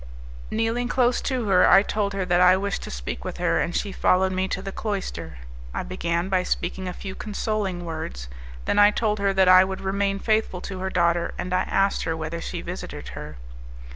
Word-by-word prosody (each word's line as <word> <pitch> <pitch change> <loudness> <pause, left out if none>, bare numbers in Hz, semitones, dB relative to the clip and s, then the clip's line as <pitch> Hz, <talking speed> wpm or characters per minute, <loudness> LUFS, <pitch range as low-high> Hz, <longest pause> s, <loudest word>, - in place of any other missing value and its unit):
Kneeling 225 +2 0
close 245 -1 +2
to 255 -3 -1
her, 185 -2 +5
I 195 - +7
told 205 -1 -1
her 195 -1 -2
that 175 0 +3
I 180 +1 +7
wished 200 0 -2
to - - -7
speak - - -5
with - - -5
her, - - +1
and 170 - -2
she 200 - -1
followed 190 0 +2
me 185 0 0
to 190 - -3
the 195 0 -6
cloister. 180 - -4 0.4
I - - -2
began 170 -1 -2
by 190 -1 +2
speaking 185 +1 -2
a - - -2
few 190 +1 -7
consoling 200 -3 -3
words; 110 - -5 0.4
then 205 - +2
I 205 0 +8
told 210 0 0
her 200 0 +2
that 190 -1 +3
I 185 0 +8
would 190 0 -4
remain 195 +1 0
faithful 215 -3 0
to 190 -1 -6
her 190 +1 -2
daughter, 170 -1 +1
and 180 0 -4
I 185 - +3
asked 195 0 +2
her 160 - -1
whether 160 +1 -4
she - - -5
visited - - -7
her. 75 +3 -8
190 Hz, 210 wpm, -24 LUFS, 175-200 Hz, 0.4 s, I